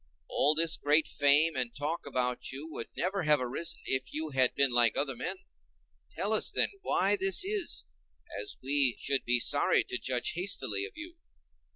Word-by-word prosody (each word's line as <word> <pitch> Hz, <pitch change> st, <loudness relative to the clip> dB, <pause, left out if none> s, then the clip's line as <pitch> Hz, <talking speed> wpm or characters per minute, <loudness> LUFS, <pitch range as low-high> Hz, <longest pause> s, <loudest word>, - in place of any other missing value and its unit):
All 150 Hz, +2 st, +2 dB
this 165 Hz, 0 st, +2 dB
great 150 Hz, +2 st, +2 dB
fame 145 Hz, +3 st, +3 dB
and 125 Hz, -2 st, -2 dB
talk 150 Hz, +3 st, -4 dB
about 125 Hz, -2 st, -2 dB
you 140 Hz, +4 st, -7 dB
would 115 Hz, -, -6 dB
never 190 Hz, +2 st, -1 dB
have 150 Hz, -2 st, +3 dB
arisen 130 Hz, +7 st, -4 dB
if 130 Hz, -1 st, -1 dB
you 155 Hz, 0 st, -4 dB
had 130 Hz, -2 st, +3 dB
been 140 Hz, -2 st, +2 dB
like 120 Hz, -2 st, +3 dB
other 140 Hz, -2 st, -2 dB
men: 150 Hz, +10 st, -4 dB, 0.7 s
tell 195 Hz, +6 st, -3 dB
us, 220 Hz, -, +3 dB
then, -, -, +1 dB
why -, -, +1 dB
this 385 Hz, -1 st, +2 dB
is, 400 Hz, -, 0 dB, 0.6 s
as 105 Hz, -, -5 dB
we 135 Hz, -2 st, +3 dB
should 140 Hz, -1 st, -1 dB
be 120 Hz, 0 st, +3 dB
sorry -, -, +3 dB
to 125 Hz, -, -4 dB
judge 125 Hz, +2 st, -1 dB
hastily 130 Hz, -, 0 dB
of -, -, -11 dB
you." 335 Hz, +3 st, -10 dB
145 Hz, 180 wpm, -30 LUFS, 125-165 Hz, 0.7 s, fame